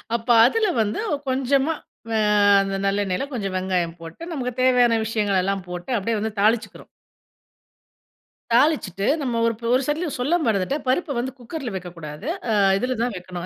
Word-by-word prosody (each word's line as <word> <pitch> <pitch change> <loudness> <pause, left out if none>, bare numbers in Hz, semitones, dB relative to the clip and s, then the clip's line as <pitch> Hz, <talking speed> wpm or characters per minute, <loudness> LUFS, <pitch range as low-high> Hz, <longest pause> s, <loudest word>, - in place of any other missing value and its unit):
அப்ப 230 -1 -4 0.2
அதில 430 - +2
வந்து 210 -1 -1 0.3
கொஞ்சமா, 270 +3 +1 0.4
வ - - -5 0.5
அந்த 195 0 -2
நல்லெண்ணெயில 195 +3 0
கொஞ்சம் 195 -6 -3
வெங்காயம் 180 -3 -1
போட்டு, 165 - -10
நமக்கு 250 -4 -3
தேவையான 245 -3 +4
விஷயங்களெல்லாம் 195 -3 0
போட்டு, 180 +5 -7
அப்படியே 220 +2 -1
வந்து 220 0 -4
தாளிச்சுக்கிறோம். 220 +2 0 1.7
தாளிச்சுட்டு, 235 - +2
நம்ம 245 -4 -1
ஒரு 230 - +2 0.2
ஒரு 255 - +3
சைட்டில 310 +5 -1
சொல்ல 280 +8 +1
மறந்துட்டேன்! 220 +6 0
பருப்ப 280 +2 0
வந்து 250 +2 -2
குக்கர்ல 250 +1 -6
வெக்கக்கூடாது. 170 - -8 0.2
அ - - +2 0.2
இதில 250 +4 -1
தான் 245 -1 0
வைக்கணும். 180 -1 -7
225 Hz, 145 wpm, -23 LUFS, 190-255 Hz, 1.7 s, தேவையான